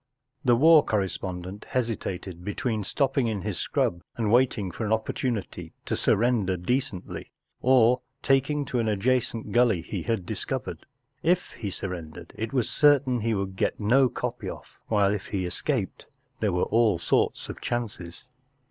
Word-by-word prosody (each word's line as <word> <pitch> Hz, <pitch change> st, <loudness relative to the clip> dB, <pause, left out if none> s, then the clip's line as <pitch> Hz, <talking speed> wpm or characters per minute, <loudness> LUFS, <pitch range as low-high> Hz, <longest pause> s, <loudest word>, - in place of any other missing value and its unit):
The 120 Hz, -4 st, +5 dB
war 155 Hz, +4 st, +7 dB
correspondent 95 Hz, -2 st, -3 dB
hesitated 95 Hz, -7 st, -3 dB
between 105 Hz, +2 st, -2 dB
stopping 135 Hz, +3 st, +1 dB
in 105 Hz, -4 st, -2 dB
his -, -, -3 dB
scrub 85 Hz, -, 0 dB, 0.2 s
and 110 Hz, -3 st, 0 dB
waiting 120 Hz, -6 st, +2 dB
for 85 Hz, -, -5 dB
an 105 Hz, -, -2 dB
opportunity 110 Hz, 0 st, -2 dB
to -, -, -2 dB
sur¬ -, -, +3 dB
render 105 Hz, -5 st, +1 dB
decently, 100 Hz, 0 st, -3 dB, 0.3 s
or 125 Hz, -1 st, +5 dB, 0.2 s
taking 140 Hz, +2 st, +2 dB
to 125 Hz, -1 st, -1 dB
an 115 Hz, -, 0 dB
adjacent 115 Hz, +2 st, 0 dB
gully 115 Hz, -8 st, +3 dB
he -, -, -4 dB
had 115 Hz, -6 st, -1 dB
dis¬ -, -, -4 dB
covered, -, -, -4 dB, 0.3 s
If 175 Hz, +2 st, +1 dB
he 105 Hz, -, -6 dB
sur¬ 95 Hz, 0 st, -4 dB
rendered 80 Hz, -4 st, -8 dB
it 110 Hz, 0 st, -4 dB
was 125 Hz, -4 st, +1 dB
cer¬ 145 Hz, -2 st, +4 dB
tain 125 Hz, -2 st, 0 dB
he 115 Hz, 0 st, 0 dB
would 95 Hz, -1 st, -3 dB
get -, -, -1 dB
no 125 Hz, +5 st, +4 dB
copy -, -, -4 dB
off; -, -, -11 dB
while, 100 Hz, -2 st, +3 dB
if 100 Hz, -2 st, -4 dB
he 95 Hz, -3 st, -2 dB
escaped, 90 Hz, -, -2 dB, 0.3 s
there 105 Hz, -2 st, +1 dB
were 90 Hz, 0 st, +1 dB
all 110 Hz, -5 st, +3 dB
sorts 85 Hz, -, 0 dB
of -, -, -8 dB
chances. 105 Hz, -8 st, -4 dB
110 Hz, 165 wpm, -26 LUFS, 95-125 Hz, 0.3 s, war